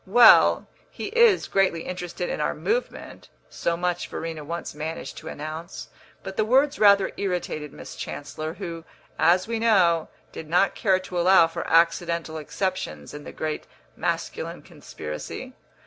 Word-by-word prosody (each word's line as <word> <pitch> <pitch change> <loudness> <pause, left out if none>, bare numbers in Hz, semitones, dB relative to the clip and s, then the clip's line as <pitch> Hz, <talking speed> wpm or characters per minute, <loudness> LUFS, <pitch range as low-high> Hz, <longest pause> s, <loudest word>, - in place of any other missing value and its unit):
"Well, 230 +3 +7 0.2
he - - -6
is 465 -2 +4
greatly 190 -4 +1
interested 180 -1 -5
in - - -3
our - - 0
movement": 480 +4 -3 0.2
so 170 0 -1
much 175 0 -1
Verena 160 -2 -5
once 170 +3 -5
managed 150 -2 -5
to - - -12
announce; 155 +3 -7 0.3
but 190 - -7
the - - +3
words 270 +6 +3
rather 200 -2 +5
irritated 175 -6 -3
Miss - - -10
Chancellor, 155 +3 -6
who, 165 -1 -6 0.4
as 175 +4 +4
we 230 -1 -2
know, 180 -8 +3 0.2
did 155 - -9
not 180 +4 +3
care 190 -3 +2
to 185 -1 -4
allow 180 -1 +6
for 165 - -5
accidental 170 -1 +2
exceptions 155 - -4
in 145 0 -9
the - - -7
great 155 -1 -4 0.3
masculine - - -3
conspiracy. 75 -1 -8
170 Hz, 150 wpm, -25 LUFS, 160-195 Hz, 0.4 s, Well